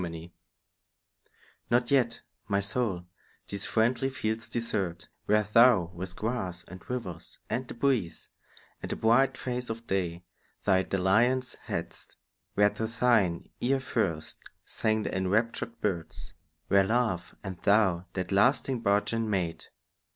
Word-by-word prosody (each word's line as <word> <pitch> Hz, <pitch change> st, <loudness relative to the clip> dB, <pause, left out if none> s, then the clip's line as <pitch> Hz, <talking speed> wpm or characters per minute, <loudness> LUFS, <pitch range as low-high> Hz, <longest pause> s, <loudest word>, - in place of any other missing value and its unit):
XXIV 85 Hz, -1 st, -6 dB, 1.4 s
NOT 120 Hz, +1 st, +2 dB
yet, 120 Hz, -4 st, +2 dB, 0.3 s
my 100 Hz, -1 st, +1 dB
soul, 100 Hz, -3 st, 0 dB, 0.4 s
these 100 Hz, 0 st, -2 dB
friendly 120 Hz, +4 st, +2 dB
fields 110 Hz, -3 st, -3 dB
desert, 100 Hz, -7 st, -2 dB, 0.2 s
Where 105 Hz, 0 st, +4 dB
thou 105 Hz, -4 st, +5 dB
with 90 Hz, +1 st, -7 dB
grass, 95 Hz, -6 st, -3 dB
and 95 Hz, 0 st, -11 dB
rivers, 95 Hz, -10 st, -5 dB
and 120 Hz, +3 st, -1 dB
the -, -, -8 dB
breeze, 120 Hz, -, 0 dB, 0.5 s
And -, -, -5 dB
the -, -, -1 dB
bright 125 Hz, +4 st, +3 dB
face 125 Hz, 0 st, -3 dB
of 115 Hz, +1 st, -5 dB
day, 90 Hz, -4 st, -2 dB, 0.4 s
thy 95 Hz, -2 st, +4 dB
dalliance 110 Hz, +8 st, +2 dB
hadst; -, -, -5 dB, 0.4 s
Where 105 Hz, 0 st, +5 dB
to 110 Hz, -, -3 dB
thine 115 Hz, -7 st, +1 dB
ear 135 Hz, +2 st, +1 dB
first 95 Hz, -11 st, -2 dB, 0.3 s
sang 110 Hz, -1 st, 0 dB
the -, -, -3 dB
enraptured 110 Hz, +5 st, 0 dB
birds; 85 Hz, -6 st, -3 dB, 0.3 s
Where 100 Hz, 0 st, +5 dB
love 110 Hz, -4 st, 0 dB
and 95 Hz, -3 st, -6 dB
thou 95 Hz, -4 st, +3 dB
that 95 Hz, -1 st, -3 dB
lasting 125 Hz, +5 st, +3 dB
bargain 110 Hz, +2 st, +1 dB
made. 90 Hz, -5 st, -2 dB
105 Hz, 130 wpm, -29 LUFS, 95-120 Hz, 1.4 s, thou